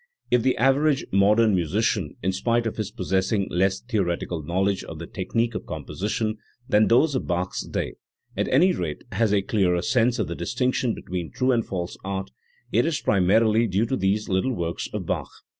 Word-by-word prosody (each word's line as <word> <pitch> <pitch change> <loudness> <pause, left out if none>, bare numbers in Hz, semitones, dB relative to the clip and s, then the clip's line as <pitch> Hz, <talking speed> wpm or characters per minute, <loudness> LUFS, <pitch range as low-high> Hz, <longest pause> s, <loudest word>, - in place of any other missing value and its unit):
If 125 - +4
the 130 +2 +1
average 135 +4 +3
modern 105 +3 +4
musician, 95 -1 0
in 95 - +2
spite 115 +5 0
of 115 - -3
his 110 -3 -2
possessing 95 +1 0
less 95 +2 +1
theoretical 90 -7 -2
knowledge 95 +5 0
of 80 - -8
the 85 - -6
technique 115 +6 -2
of 110 - -6
composition 110 +2 -3 0.3
than 105 +1 +4
those 140 +6 +4
of 130 - -2
Bach's 90 +1 -1
day, - - -3 0.4
at - - 0
any 170 +9 +4
rate 80 -4 -4
has 110 +1 +1
a 100 -1 +2
clearer 90 -4 +1
sense 120 +2 +2
of 110 - -1
the 85 - -3
distinction 125 +7 -1
between 90 -3 -5
true 130 0 +1
and 120 -2 +2
false 90 -2 -4
art, 95 0 -4 0.4
it 120 - +3
is 165 -3 0
primarily 110 +4 +3
due 100 +3 +1
to 130 - -1
these 100 0 0
little 95 +7 0
works 85 -1 -3
of - - -4
Bach. - - -2
105 Hz, 185 wpm, -24 LUFS, 95-115 Hz, 0.4 s, If